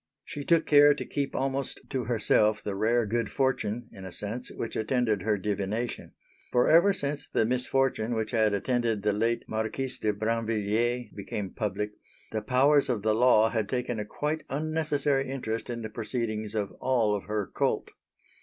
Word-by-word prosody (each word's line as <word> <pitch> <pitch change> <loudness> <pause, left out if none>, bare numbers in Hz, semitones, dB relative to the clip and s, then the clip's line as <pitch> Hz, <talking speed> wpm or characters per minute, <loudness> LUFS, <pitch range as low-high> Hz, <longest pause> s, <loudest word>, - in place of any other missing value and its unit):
She 145 - -6
took 165 +2 +3
care 145 0 +7
to - - -5
keep 140 -1 -3
almost 135 0 -2
to 130 -4 -2
herself 110 -2 +2
the 105 - -3
rare 115 +4 +2
good 115 +1 -1
fortune, 120 -3 -1
in 95 - -11
a 95 - -7
sense, 110 +7 -4
which 115 - -5
attended 110 -3 +1
her 105 +2 +1
divination; 105 +4 -3 0.4
for 125 - +3
ever 170 +5 +6
since 145 -6 -3
the 110 - +2
misfortune 125 -1 +1
which 110 -1 -2
had 110 -3 +3
attended 115 0 0
the 105 -1 +2
late 115 +3 0
Marquise 110 +4 -3
de 105 - +1
Brinvilliers 115 +2 -1
became 100 -1 -5
public, 105 -1 -2 0.4
the 110 - -2
powers 135 +6 +3
of 115 -5 -1
the 110 0 +3
law 110 -1 +5
had 110 -3 -1
taken 125 -3 -2
a - - -1
quite 150 +8 -3
unnecessary 145 -2 0
interest 115 -4 -3
in 120 -1 -4
the 110 - -4
proceedings 110 -2 -3
of 100 -2 -1
all 120 -5 +2
of 100 - -5
her 105 0 -1
cult. - - 0
115 Hz, 175 wpm, -28 LUFS, 105-130 Hz, 0.4 s, care